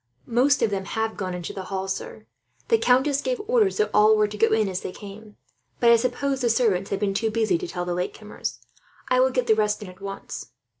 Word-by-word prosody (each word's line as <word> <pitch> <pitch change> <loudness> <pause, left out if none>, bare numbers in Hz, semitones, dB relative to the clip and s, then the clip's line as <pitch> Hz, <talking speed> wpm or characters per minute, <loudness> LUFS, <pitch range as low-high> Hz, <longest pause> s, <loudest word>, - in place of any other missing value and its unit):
"Most 255 +3 +2
of 220 - +2
them 195 -1 -2
have 220 +1 -2
gone 185 -2 -4
into 175 -1 -6
the 190 -1 -6
hall, 190 0 -4
sir. 190 - -5 0.4
The 455 - +4
countess 270 +1 +3
gave - - -2
orders 445 -4 +2
that 430 - +1
all 215 +1 +5
were 210 0 +3
to 210 - -8
go 225 +2 +3
in 220 -1 +2
as 185 -1 -3
they - - -5
came; 210 +2 -11 0.4
but 235 -1 +5
I - - +8
suppose 260 +3 -1
the 240 - +2
servants 215 -5 +1
have 200 - -2
been 200 -1 0
too 220 +3 0
busy 215 -6 +1
to - - -5
tell 175 +1 -4
the 175 - -2
latecomers. 185 +4 -5 0.4
I 255 - +3
will 260 +1 +4
get 255 -1 -1
the 225 - +4
rest 210 0 0
in, 195 - -9
at 185 +1 -15
once." 195 - -7
215 Hz, 240 wpm, -24 LUFS, 195-250 Hz, 0.4 s, I